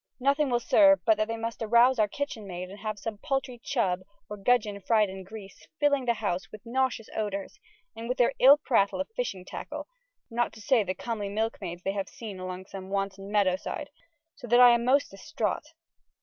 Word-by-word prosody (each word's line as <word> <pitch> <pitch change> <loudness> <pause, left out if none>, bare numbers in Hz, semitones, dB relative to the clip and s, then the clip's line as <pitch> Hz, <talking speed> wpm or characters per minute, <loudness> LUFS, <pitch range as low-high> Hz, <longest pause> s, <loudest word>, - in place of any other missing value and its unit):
Nothing 280 +2 +2
will 240 -1 +2
serve 290 +4 +5
but 220 -2 +4
they 230 0 -3
must 230 +1 -5
arouse 235 +3 +4
our 215 - +4
kytchen 225 -3 -5
maide 180 0 -6
and 200 - -10
have 215 0 -4
some 210 +1 -6
paltry 265 -2 -2
chubb 190 -9 0 0.3
or 210 - -6
gudgeon 210 -1 +1
fryed 215 0 +3
in 190 0 -8
greese, 200 0 -12
filling 285 -3 +2
ye 235 - +4
house 190 -4 -3
wyth 215 - -11
nauseous 245 -2 -1
odoures, 200 -3 -4 0.4
and 230 +1 -7
wyth 250 - -1
their 245 +2 +3
ill 275 +3 +8
prattle 230 -9 +1
of 280 - -3
fyshing 195 - -3
tackle, - - -7 0.5
not 240 +1 0
to 220 - -13
say 225 +1 +3
the 185 -1 -3
comely 220 -4 -4
milke 220 +3 -2
maides 175 +1 -6
they 195 - -1
have 200 -1 -3
seen 210 -5 -8
along 185 0 -6
some 190 0 -9
wanton 195 0 -3
meadowside, 205 +8 0 0.4
soe 250 - -11
that 240 +1 +5
I 245 -1 +9
am 235 0 +2
moste 275 +3 +3
distraught. 305 - -3
220 Hz, 200 wpm, -28 LUFS, 195-250 Hz, 0.5 s, I